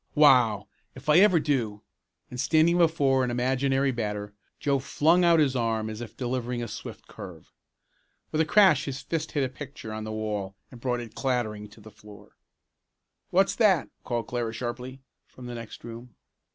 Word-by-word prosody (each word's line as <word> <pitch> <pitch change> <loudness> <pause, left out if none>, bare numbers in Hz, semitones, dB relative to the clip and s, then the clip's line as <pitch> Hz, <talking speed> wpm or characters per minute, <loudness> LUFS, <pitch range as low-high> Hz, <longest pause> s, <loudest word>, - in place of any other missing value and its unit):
"Wow! 125 -8 +5 0.3
If 130 +3 -8
I 150 +3 +7
ever 185 -4 +6
do!" 115 -9 -1 0.5
and 125 - -7
standing 160 +6 +3
before 140 -6 +3
an 125 - 0
imaginary 135 +2 +1
batter 105 -3 -4 0.3
Joe 140 -1 +1
flung 160 +6 +2
out 170 -1 +5
his 140 -4 +2
arm 110 -2 -1
as 110 +1 -7
if 120 - -9
delivering 125 -1 -2
a - - -4
swift - - -8
curve. 85 -5 -11 0.8
With 155 - +1
a - - +2
crash 185 -6 +5
his 140 -1 -4
fist 160 -1 -3
hit 145 -3 +1
a - - +1
picture 130 -3 -9
on 110 0 -5
the 110 - -5
wall 105 -3 -3 0.2
and 120 - -13
brought 125 -1 -1
it 115 -2 -10
clattering 120 -6 -2
down - - -13
to 110 - -16
the 110 +1 -13
floor. 105 -1 -16 0.9
"What's 190 +2 +3
that?" 195 -9 +3
called 120 -2 -2
Clara 120 -1 -3
sharply 125 +2 -6 0.3
from 125 - -13
the 120 - -6
next 115 -2 -9
room. 115 0 -10
125 Hz, 180 wpm, -27 LUFS, 110-145 Hz, 0.9 s, I